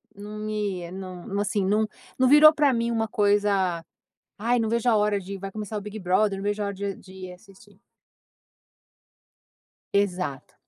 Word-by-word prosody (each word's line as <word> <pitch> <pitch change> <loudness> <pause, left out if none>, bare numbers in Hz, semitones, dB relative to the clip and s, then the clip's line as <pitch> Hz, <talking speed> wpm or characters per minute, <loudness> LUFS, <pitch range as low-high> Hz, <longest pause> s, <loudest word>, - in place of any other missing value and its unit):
não 210 +1 -8
me 205 -5 -3
não, 190 +2 -6
assim, 205 0 0
não 210 +3 +2 0.3
num 260 - +4
virou 300 +3 +8
para 295 -3 +3
mim 235 0 0
uma 225 -1 0
coisa, 200 -5 +1 0.5
"Ai 235 +4 +1
não 225 -1 0
vejo 235 +2 0
a 225 - +5
hora 210 -1 +1
de, 195 +1 -7
vai 195 +1 -7
começar 215 0 -5
o - - -2
Big 210 +1 -7
Brother, 195 +2 +1
não - - -6
vejo 205 +1 -1
a - - -1
hora 200 - -4
de 200 0 -4
de 190 - -15
ir 180 - -9
assistir". 195 +2 -18 2.1
Exato. 180 -8 -1
205 Hz, 175 wpm, -25 LUFS, 195-215 Hz, 2.1 s, virou